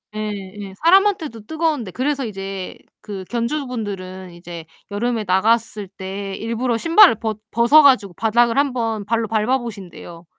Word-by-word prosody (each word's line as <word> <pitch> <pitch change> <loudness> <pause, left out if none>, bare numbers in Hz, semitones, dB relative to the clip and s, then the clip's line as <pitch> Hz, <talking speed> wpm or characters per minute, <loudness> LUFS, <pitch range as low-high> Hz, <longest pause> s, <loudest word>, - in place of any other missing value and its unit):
예예. 205 -2 -6
사람한테도 335 - +3
뜨거운데 310 - -1
그래서 270 +3 -1
이제 195 -3 -6 0.2
그 200 -3 -7
견주분들은 215 -7 -4
이제 170 -1 -9 0.3
여름에 225 +1 -1
나갔을 215 +2 +1
때 195 +1 -6
일부러 230 +1 -2
신발을 335 - +6
벗 220 -1 -4
벗어 240 +7 +6
가지고 230 -10 +4
바닥을 230 +4 +2
한번 230 -7 -1
발로 230 0 0
밟아 225 +4 +1
보신대요. 190 -7 -9
225 Hz, 325 characters per minute, -20 LUFS, 195-245 Hz, 0.3 s, 신발을